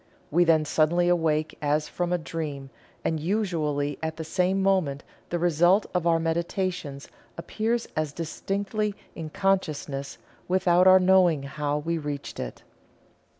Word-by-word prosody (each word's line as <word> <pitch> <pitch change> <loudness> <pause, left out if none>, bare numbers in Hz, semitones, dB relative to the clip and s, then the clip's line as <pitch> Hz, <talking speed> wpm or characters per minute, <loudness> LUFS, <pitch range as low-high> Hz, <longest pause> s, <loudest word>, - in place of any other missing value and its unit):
We 175 +3 +4
then 160 -2 +4
suddenly 165 +3 +2
awake 160 -3 +1
as 150 +1 +1
from 175 -1 -3
a 180 - +2
dream, 150 -5 -5 0.3
and 160 - 0
usually 155 -6 -1
at 160 0 -3
the 160 - -4
same 180 +4 0
moment 180 -8 +1 0.3
the 175 - -1
result 175 +4 +3
of 180 -2 0
our 165 -1 +4
meditations 165 -3 -2 0.3
appears 225 +7 -2
as 155 -2 -1
distinctly 200 +6 -3 0.2
in 160 -2 -6
consciousness 155 -7 -1 0.3
without 180 0 +4
our 185 0 +8
knowing 180 -5 +4
how 145 +1 -2
we 165 +2 -2
reached 145 -2 -5
it." - - -6
165 Hz, 140 wpm, -26 LUFS, 150-185 Hz, 0.3 s, our